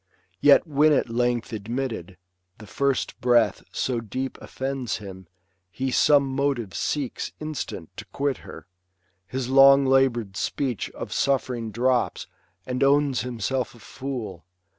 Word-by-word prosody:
Yet 145 - +6
when 150 0 +4
at 120 - +1
length 120 0 0
admitted, 110 -4 -4 0.4
the 105 - -12
flrst 140 +5 -1
breath 120 -1 +3
So 125 -3 -1
deep 130 +4 -4
offends 130 -3 -3
him, 95 -3 -10 0.4
he 130 +7 -3
some 145 +3 +5
motive 135 -7 -1
seeks 135 - -3
Instant 155 - -6
to - - -7
quit 140 -1 -2
her; - - -11 0.6
his 130 +1 -3
long 135 +1 +7
labour'd 130 -6 +2
speech 130 -7 -2
Of - - -6
suffering 125 -4 0
drops, 125 +3 0 0.4
and 125 0 -3
owns 140 -1 +3
himself 125 +2 -3
a - - -16
fool. 120 -11 -6
130 Hz, 130 wpm, -25 LUFS, 115-135 Hz, 0.6 s, long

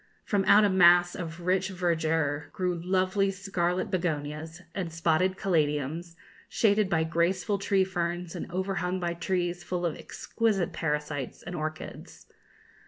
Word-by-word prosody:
From 200 -2 +1
out 205 +2 +7
a - - +3
mass 175 -1 +6
of 165 -1 -6
rich 185 +2 +1
verdure 160 -5 0
grew 180 -1 0
lovely 185 +2 +1
scarlet 185 -2 -1
begonias, 160 -2 -3
and 180 -4 -3
spotted 165 +3 +1
caladiums, 160 -1 0 0.3
shaded 210 -2 +2
by 160 -3 +2
graceful 175 +5 0
tree 195 -1 +2
ferns 175 -1 -3
and 175 - -6
overhung 185 0 -1
by 175 -1 -1
trees 175 0 -2
full 180 -1 -2
of 165 - -1
exquisite 210 -7 -1
parasites 150 -4 -3
and 175 +1 -6
orchids. 155 -1 -6
175 Hz, 135 wpm, -28 LUFS, 165-190 Hz, 0.3 s, out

